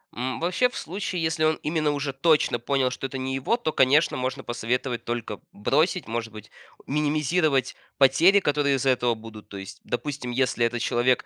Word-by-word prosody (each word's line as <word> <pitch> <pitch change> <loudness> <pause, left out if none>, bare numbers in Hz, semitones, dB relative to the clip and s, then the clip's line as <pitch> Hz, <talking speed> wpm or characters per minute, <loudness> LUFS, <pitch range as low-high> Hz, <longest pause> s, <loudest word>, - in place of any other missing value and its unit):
М, 125 +1 -3
вообще, 180 +9 +2
в - - -9
случае, 180 0 -4
если 160 0 0
он 155 0 +2
именно 155 -1 0
уже 145 -1 -3
точно 150 -3 +2
понял, 130 +1 0
что 135 - -4
это 135 - -6
не 130 0 -3
его, 135 - 0
то 160 -10 -2
конечно 145 +5 +4
можно 130 +1 -3
посоветовать 120 +1 -2
только 115 -3 -4
бросить, 155 - 0
может 115 0 -3
быть 105 0 -11 0.4
минимизировать 150 -1 +1 0.2
потери, 160 +9 +5
которые 145 -5 +1
из-за 135 0 0
этого 120 -2 +1
будут. 110 -1 -12
То 100 - -8
есть, 95 +1 -9
допустим, 130 0 -4
если 120 -1 +1
этот 120 +1 -1
человек 120 +2 +1
135 Hz, 180 wpm, -25 LUFS, 120-155 Hz, 0.4 s, потери